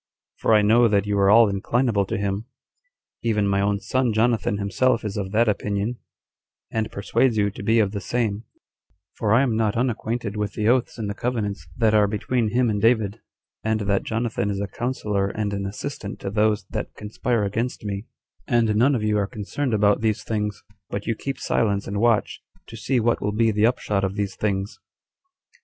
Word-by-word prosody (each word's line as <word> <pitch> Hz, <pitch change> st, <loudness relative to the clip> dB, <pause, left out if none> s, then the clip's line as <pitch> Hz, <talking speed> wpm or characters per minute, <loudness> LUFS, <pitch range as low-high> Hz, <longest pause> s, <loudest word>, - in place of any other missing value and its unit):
for 110 Hz, -, +3 dB
I 105 Hz, -, +5 dB
know 115 Hz, +3 st, +5 dB
that 100 Hz, -2 st, +2 dB
you 105 Hz, 0 st, -1 dB
are 100 Hz, 0 st, +4 dB
all 115 Hz, +2 st, +7 dB
inclinable 100 Hz, +1 st, 0 dB
to -, -, -2 dB
him; 100 Hz, +2 st, -2 dB, 0.7 s
[even 105 Hz, -3 st, +1 dB
my 100 Hz, 0 st, +2 dB
own 100 Hz, 0 st, +1 dB
son 125 Hz, +1 st, 0 dB
Jonathan 110 Hz, -2 st, +1 dB
himself 115 Hz, +4 st, +1 dB
is 105 Hz, -, -3 dB
of 95 Hz, -2 st, -3 dB
that 115 Hz, +3 st, +3 dB
opinion, 105 Hz, +3 st, -1 dB, 0.7 s
and 110 Hz, -1 st, -2 dB
persuades 110 Hz, +4 st, +1 dB
you 100 Hz, -1 st, +2 dB
to 100 Hz, -, -9 dB
be 110 Hz, +3 st, +2 dB
of 105 Hz, -3 st, +3 dB
the 100 Hz, -1 st, -4 dB
same]; 110 Hz, 0 st, -1 dB, 0.7 s
for 105 Hz, -, -1 dB
I 120 Hz, +5 st, +5 dB
am 120 Hz, -5 st, 0 dB
not 110 Hz, -1 st, +1 dB
unacquainted 115 Hz, -3 st, -2 dB
with 105 Hz, -1 st, -2 dB
the 105 Hz, -1 st, -1 dB
oaths 125 Hz, +1 st, +2 dB
and 110 Hz, -3 st, -3 dB
the 100 Hz, -, -2 dB
covenants 110 Hz, -3 st, -3 dB
that 110 Hz, -2 st, +3 dB
are 105 Hz, -1 st, +5 dB
between 115 Hz, +3 st, -1 dB
him 120 Hz, +3 st, +2 dB
and 105 Hz, -2 st, 0 dB
David, 110 Hz, -2 st, +2 dB, 0.4 s
and 110 Hz, 0 st, 0 dB
that 100 Hz, -1 st, +1 dB
Jonathan 115 Hz, -3 st, -2 dB
is 100 Hz, -1 st, -2 dB
a 100 Hz, -, -1 dB
counselor 105 Hz, -3 st, -2 dB
and 100 Hz, 0 st, -3 dB
an 100 Hz, 0 st, -2 dB
assistant 105 Hz, 0 st, -6 dB
to 95 Hz, -, -4 dB
those 105 Hz, 0 st, +1 dB
that -, -, -4 dB
conspire 110 Hz, +2 st, -1 dB
against 115 Hz, +3 st, -2 dB
me, 100 Hz, +1 st, -4 dB, 0.4 s
and 115 Hz, -3 st, +2 dB
none 130 Hz, +6 st, +4 dB
of 110 Hz, -, -2 dB
you 105 Hz, -1 st, +2 dB
are 100 Hz, -, 0 dB
concerned 120 Hz, +6 st, -3 dB
about 105 Hz, 0 st, +3 dB
these 110 Hz, -2 st, 0 dB
things, 105 Hz, -3 st, -3 dB, 0.3 s
but 100 Hz, 0 st, -4 dB
you 115 Hz, -, 0 dB
keep 135 Hz, +4 st, -5 dB
silence 100 Hz, -4 st, 0 dB
and 100 Hz, +1 st, -3 dB
watch, 115 Hz, -2 st, +1 dB, 0.2 s
to 115 Hz, -, -11 dB
see 125 Hz, +3 st, 0 dB
what 115 Hz, +1 st, +1 dB
will 105 Hz, 0 st, -1 dB
be 115 Hz, +1 st, +3 dB
the 105 Hz, +1 st, +3 dB
upshot 105 Hz, -5 st, -1 dB
of 95 Hz, 0 st, -1 dB
these 100 Hz, -3 st, -2 dB
things." 100 Hz, 0 st, -2 dB
105 Hz, 200 wpm, -23 LUFS, 100-115 Hz, 0.7 s, all